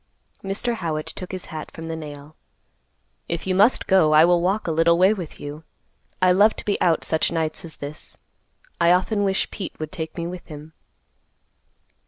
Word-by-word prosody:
Mr. 200 Hz, +5 st, -1 dB
Howitt 155 Hz, -5 st, -3 dB
took 185 Hz, -, -6 dB
his 185 Hz, -1 st, -6 dB
hat 155 Hz, -1 st, -6 dB
from 165 Hz, -, -10 dB
the 165 Hz, -, -3 dB
nail. 150 Hz, -1 st, -9 dB, 0.9 s
"If 170 Hz, -1 st, -3 dB
you 190 Hz, -, 0 dB
must 205 Hz, +7 st, +4 dB
go, 185 Hz, -6 st, +4 dB
I 155 Hz, +2 st, +8 dB
will 175 Hz, 0 st, +3 dB
walk 195 Hz, +4 st, 0 dB
a 165 Hz, -, -1 dB
little 165 Hz, +1 st, +3 dB
way 190 Hz, +4 st, +5 dB
with 180 Hz, -7 st, -7 dB
you. 145 Hz, +2 st, -7 dB, 0.6 s
I 185 Hz, -, +6 dB
love 205 Hz, +4 st, +5 dB
to -, -, -9 dB
be 205 Hz, -, -1 dB
out 165 Hz, -3 st, +2 dB
such 160 Hz, -, +1 dB
nights 160 Hz, -2 st, -2 dB
as 165 Hz, -2 st, -9 dB
this. 145 Hz, +2 st, -8 dB, 0.6 s
I 170 Hz, +1 st, +5 dB
often 205 Hz, +3 st, +1 dB
wish 190 Hz, -1 st, 0 dB
Pete 195 Hz, -4 st, -7 dB
would 155 Hz, -1 st, -5 dB
take 160 Hz, 0 st, -6 dB
me 170 Hz, -, -3 dB
with 175 Hz, +1 st, -7 dB
him." 155 Hz, 0 st, -10 dB
170 Hz, 190 wpm, -23 LUFS, 155-190 Hz, 0.9 s, I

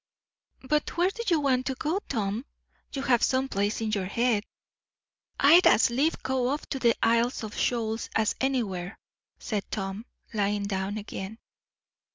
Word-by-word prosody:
"But 300 Hz, +4 st, -1 dB
where 360 Hz, +2 st, +3 dB
do 465 Hz, -, -6 dB
you 335 Hz, -5 st, +3 dB
want 260 Hz, -3 st, +1 dB
to 265 Hz, -, -1 dB
go, 320 Hz, +8 st, -1 dB
Tom? 215 Hz, -1 st, -1 dB, 0.5 s
you 275 Hz, -, -4 dB
have 240 Hz, -2 st, +3 dB
some 260 Hz, +1 st, +2 dB
place 205 Hz, -1 st, -1 dB
in 220 Hz, -1 st, -1 dB
your 195 Hz, -3 st, -1 dB
head." 230 Hz, +1 st, +1 dB, 1.0 s
"I'd 325 Hz, +6 st, +7 dB
as 230 Hz, -, +5 dB
lief 285 Hz, +7 st, 0 dB
go 260 Hz, -2 st, 0 dB
off 290 Hz, +2 st, -2 dB
for 270 Hz, -, -2 dB
the 235 Hz, -2 st, +3 dB
Isles 235 Hz, +2 st, +2 dB
of 215 Hz, 0 st, -6 dB
Shoals 225 Hz, -2 st, -1 dB
as 220 Hz, -1 st, +2 dB
anywhere," 215 Hz, -9 st, -1 dB, 0.4 s
said 210 Hz, -3 st, -4 dB
Tom, 195 Hz, +3 st, -4 dB, 0.3 s
lying 205 Hz, -1 st, 0 dB
down 200 Hz, +1 st, -2 dB
again. 205 Hz, 0 st, -6 dB
235 Hz, 160 wpm, -27 LUFS, 205-265 Hz, 1.0 s, I'd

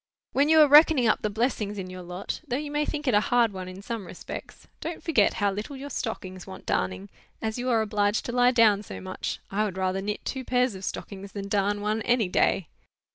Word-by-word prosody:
when 280 Hz, +3 st, +2 dB
you 320 Hz, 0 st, +6 dB
are 305 Hz, -, +8 dB
reckoning 295 Hz, -2 st, +7 dB
up 220 Hz, -, +3 dB
the 215 Hz, -, 0 dB
blessings 210 Hz, -2 st, -1 dB
in 190 Hz, -2 st, -4 dB
your 185 Hz, 0 st, -8 dB
lot,—though 180 Hz, +7 st, -4 dB
you 295 Hz, 0 st, -5 dB
may 295 Hz, 0 st, 0 dB
think 300 Hz, -1 st, -4 dB
it 255 Hz, -, +3 dB
a 205 Hz, -, +6 dB
hard 235 Hz, 0 st, +2 dB
one 185 Hz, -1 st, -6 dB
in 185 Hz, +2 st, -9 dB
some 225 Hz, -4 st, -5 dB
respects,—don't 320 Hz, -, -8 dB
forget 270 Hz, -12 st, +3 dB
how 205 Hz, -1 st, +1 dB
little 210 Hz, +8 st, -5 dB
your 280 Hz, +2 st, -7 dB
stockings 185 Hz, -6 st, -5 dB
want 190 Hz, -, -10 dB
darning, 95 Hz, +1 st, -1 dB, 0.3 s
as 220 Hz, +1 st, -3 dB
you 250 Hz, +1 st, -1 dB
are 225 Hz, -2 st, +3 dB
obliged 205 Hz, 0 st, 0 dB
to -, -, -3 dB
lie 245 Hz, 0 st, +4 dB
down 225 Hz, -5 st, +4 dB
so 210 Hz, -, -8 dB
much! 185 Hz, 0 st, -4 dB
I 205 Hz, +2 st, +1 dB
would 195 Hz, -3 st, -3 dB
rather 190 Hz, 0 st, 0 dB
knit 210 Hz, +1 st, -4 dB
two 265 Hz, -1 st, -3 dB
pairs 250 Hz, -1 st, +1 dB
of 190 Hz, 0 st, -9 dB
stockings 200 Hz, -1 st, -6 dB
than 200 Hz, -1 st, -5 dB
darn 205 Hz, 0 st, +1 dB
one, 215 Hz, +2 st, 0 dB
any 235 Hz, -4 st, +2 dB
day." 180 Hz, -1 st, +2 dB
210 Hz, 225 wpm, -26 LUFS, 195-250 Hz, 0.3 s, are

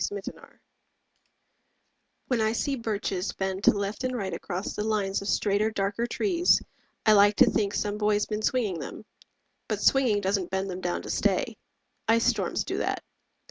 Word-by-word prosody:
BIRCHES 200 Hz, -1 st, -6 dB, 1.9 s
When 245 Hz, -4 st, 0 dB
I 220 Hz, 0 st, +2 dB
see 275 Hz, +4 st, -1 dB
birches 210 Hz, -5 st, -2 dB
bend 190 Hz, 0 st, -3 dB
to -, -, +8 dB
left 200 Hz, +4 st, -3 dB
and 255 Hz, -1 st, -1 dB
right 195 Hz, -4 st, -3 dB
Across 185 Hz, +1 st, -4 dB
the 210 Hz, -, -3 dB
lines 205 Hz, -3 st, 0 dB
of 200 Hz, -, -6 dB
straighter 205 Hz, +1 st, +2 dB
darker 205 Hz, +2 st, -1 dB
trees, 350 Hz, -, +3 dB, 0.5 s
I 215 Hz, -, +7 dB
like 205 Hz, 0 st, +6 dB
to -, -, +7 dB
think 205 Hz, -2 st, 0 dB
some 210 Hz, 0 st, -1 dB
boy's 210 Hz, 0 st, +2 dB
been 215 Hz, 0 st, -3 dB
swinging 215 Hz, -7 st, 0 dB
them. 150 Hz, +9 st, -8 dB, 0.6 s
But -, -, -2 dB
swinging 250 Hz, -6 st, +4 dB
doesn't 195 Hz, -2 st, -1 dB
bend 190 Hz, 0 st, -2 dB
them 180 Hz, +1 st, -6 dB
down 175 Hz, -1 st, -2 dB
to -, -, -5 dB
stay. -, -, 0 dB, 0.5 s
Ice 230 Hz, +1 st, +3 dB
storms -, -, +1 dB
do -, -, -3 dB
that. -, -, -2 dB
205 Hz, 170 wpm, -27 LUFS, 195-220 Hz, 1.9 s, to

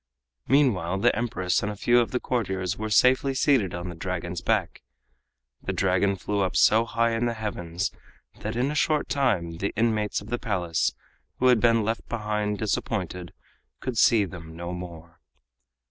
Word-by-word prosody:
Meanwhile 95 Hz, -, +2 dB
the -, -, +3 dB
Empress 90 Hz, -6 st, 0 dB
and 105 Hz, -, -2 dB
a -, -, -6 dB
few 120 Hz, +4 st, +3 dB
of 120 Hz, -, +1 dB
the 125 Hz, -, -1 dB
courtiers 95 Hz, -8 st, -2 dB
were 110 Hz, 0 st, -4 dB
safely 130 Hz, +5 st, +4 dB
seated 130 Hz, -, +2 dB
on 90 Hz, +1 st, -5 dB
the -, -, -6 dB
Dragon's 85 Hz, 0 st, -4 dB
back. -, -, 0 dB, 0.8 s
The -, -, -3 dB
Dragon 95 Hz, +1 st, +2 dB
flew 100 Hz, +2 st, -3 dB
up 95 Hz, -, -1 dB
so 110 Hz, +2 st, +5 dB
high 115 Hz, 0 st, +1 dB
in 115 Hz, +1 st, 0 dB
the 120 Hz, -, -2 dB
heavens 90 Hz, -5 st, -3 dB, 0.5 s
that 110 Hz, +2 st, -4 dB
in 130 Hz, +4 st, 0 dB
a -, -, -3 dB
short 150 Hz, +1 st, +1 dB
time 90 Hz, -12 st, 0 dB
the 100 Hz, +3 st, -2 dB
inmates 110 Hz, -2 st, +1 dB
of 100 Hz, -, -12 dB
the 120 Hz, 0 st, -2 dB
Palace, 90 Hz, -9 st, -1 dB, 0.4 s
who 130 Hz, -, +3 dB
had 125 Hz, -3 st, +5 dB
been 115 Hz, -1 st, +3 dB
left 115 Hz, +2 st, -3 dB
behind 105 Hz, -2 st, -2 dB
disappointed, 95 Hz, -4 st, -3 dB, 0.5 s
could 130 Hz, -2 st, -4 dB
see 110 Hz, -4 st, +5 dB
them 85 Hz, -3 st, -10 dB
no 85 Hz, +1 st, -5 dB
more. 85 Hz, -2 st, -9 dB
105 Hz, 175 wpm, -26 LUFS, 90-115 Hz, 0.8 s, so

